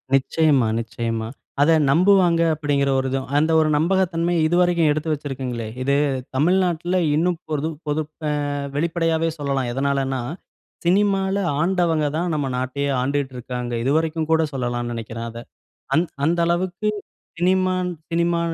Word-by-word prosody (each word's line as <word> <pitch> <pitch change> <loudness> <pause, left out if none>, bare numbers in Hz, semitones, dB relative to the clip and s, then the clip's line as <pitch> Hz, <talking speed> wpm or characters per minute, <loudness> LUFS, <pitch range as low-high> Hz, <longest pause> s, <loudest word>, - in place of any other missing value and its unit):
நிச்சியமா, 140 -2 +2
நிச்சியமா. 115 -1 -3 0.3
அத 150 - +5 0.2
நம்புவாங்க 175 +1 +4
அப்டிங்கிற 145 -2 0
ஒரு 130 - -1
இதும். 135 0 -2
அந்த 155 +2 +2
ஒரு 155 -1 +2
நம்பகத்தன்மையை 170 0 +1
இதுவரைக்கும் 175 -2 +3
எடுத்து 155 +1 -1
வச்சிருக்கீங்களே! 130 -5 -4 0.2
இது 140 +1 +2 0.4
தமிழ்நாட்ல 175 +3 +2 0.2
இன்னும் 175 +2 +1
பொருதும் 155 +1 -2
பொது 150 +1 0 0.3
ஆ - - +1 0.4
வெளிப்படையாவே 165 +1 0
சொல்லலாம். 135 -3 -1
எதனாலன்னா, 135 -1 0 0.6
சினிமால 195 +1 +2 0.3
ஆண்டவங்க 170 -4 +1
தான் 175 +1 -1
நம்ம 145 -2 -1
நாட்டையே 130 +3 -2
ஆண்டுட்டு 135 0 -1
இருக்காங்க. 125 0 -5
இதுவரைக்கும் 160 +3 0
கூட 160 0 +4
சொல்லலாம்னு 120 -2 -2
நெனைக்கிறேன் 115 0 -5
அத. 115 0 -8 0.6
அந் 165 +4 +3 0.2
அந்த 170 +2 +1
அளவுக்கு 180 +4 0 0.5
சினிமா 185 +1 +2 0.4
சினிமா 170 0 +1
155 Hz, 125 wpm, -22 LUFS, 135-175 Hz, 0.6 s, அத